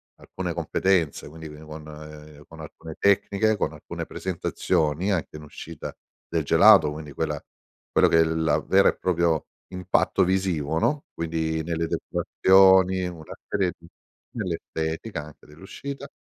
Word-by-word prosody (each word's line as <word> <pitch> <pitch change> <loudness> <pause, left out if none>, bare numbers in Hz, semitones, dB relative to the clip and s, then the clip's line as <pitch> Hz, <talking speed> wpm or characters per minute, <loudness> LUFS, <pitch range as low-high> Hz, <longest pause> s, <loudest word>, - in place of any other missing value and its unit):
alcune - - -5
competenze, 90 -8 0
quindi 80 0 -10
vi 75 0 -11
con 75 -1 -11
con 80 0 -13
alcune 80 +1 -10
tecniche, 100 +2 +2
con - - -1
alcune - - -7
presentazioni, 85 -1 -1
anche 80 -4 -2
in 75 - -11
uscita 80 +1 -9 0.3
del 80 -2 -1
gelato, 75 +1 +6
quindi 75 -1 -8
quella 75 -1 -2 0.5
quello - - +5
che 80 - +3
è - - +7
il 80 0 0
la - - +2
vera 95 0 +4
e - - -2
proprio 85 -3 +1 0.2
impatto 90 -1 +1
visivo, 90 -5 0
no, 145 - 0
quindi 80 -1 -2
nelle 85 0 -2
decorazioni, 95 0 +4
una 80 -3 -9
serie 90 -4 0
di 85 0 -17 0.5
nell'estetica 80 -2 -4
anche 75 - -16
dell'uscita. 135 - -8
80 Hz, 140 wpm, -25 LUFS, 75-95 Hz, 0.5 s, è